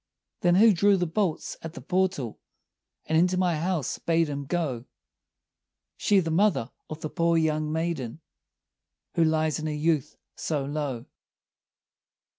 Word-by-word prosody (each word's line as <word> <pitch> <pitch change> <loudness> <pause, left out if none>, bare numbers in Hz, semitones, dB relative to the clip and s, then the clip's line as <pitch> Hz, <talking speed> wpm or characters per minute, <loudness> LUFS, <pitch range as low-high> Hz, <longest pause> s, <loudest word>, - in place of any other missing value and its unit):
"Then 175 0 +3
who 215 +3 +7
drew 200 +2 +4
the 180 - 0
bolts 175 0 -1
at 165 0 -8
the - - -6
portal, 180 - -1 0.7
And 160 - -1
into 180 +2 +3
my 180 -3 +2
house 165 -4 -1
bade 165 -1 +1
him 140 -1 -4
go?" 135 -7 -2 1.1
"She, 200 - +3
the 165 -3 -1
mother 170 - +2 0.2
of 155 0 -7
the 155 - -3
poor 170 0 +2
young 155 -1 +1
maiden, 160 -6 -2 0.9
Who 165 - +3
lies 155 -1 +1
in 155 - -3
her - - -1
youth 150 -2 0 0.2
so 145 -4 -2
low." 140 -5 -3
160 Hz, 145 wpm, -27 LUFS, 150-175 Hz, 1.1 s, who